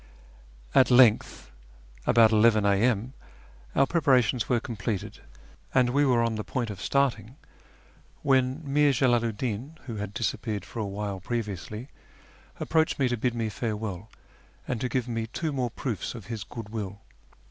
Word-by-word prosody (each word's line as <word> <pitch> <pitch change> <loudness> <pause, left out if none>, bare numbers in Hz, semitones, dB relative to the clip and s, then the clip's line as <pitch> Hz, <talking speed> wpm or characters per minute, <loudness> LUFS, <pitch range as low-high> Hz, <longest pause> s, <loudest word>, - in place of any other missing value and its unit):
At 130 - +5
length, 120 - +4 0.6
about 115 -1 +6
11 110 -1 +4
a.m., 110 +4 +2 0.6
our - - +5
preparations 130 -7 +2
were 120 - +3
completed, 110 -3 -4 0.6
and 125 -2 +4
we 145 +2 +3
were 120 -2 +3
on 115 -1 0
the 110 -1 -3
point 120 -3 -3
of 100 -2 -9
starting, 130 -4 0 0.9
when 130 +2 +2
Mir 145 0 +3
Jalalu 120 -3 +2
'd 105 - -14
Din 130 +7 -4
(who 115 -5 -5
had 105 -1 -4
disappeared 105 -2 -2
for 115 - -8
a 105 - -1
while 100 -1 -4
previously) 105 +2 -4 0.7
approached 160 -1 +1
me 130 -3 +2
to 120 - 0
bid 120 +1 -1
me 115 -1 -1
farewell 105 -2 -4 0.6
and 125 -3 -2
to 125 - -1
give 125 0 -1
me 115 -2 -2
two 155 +6 -3
more 125 -3 -1
proofs 120 -1 -4
of 115 -5 -9
his 110 -3 -4
good 115 -3 -8
will. 100 -3 -5
115 Hz, 160 wpm, -27 LUFS, 105-130 Hz, 0.9 s, about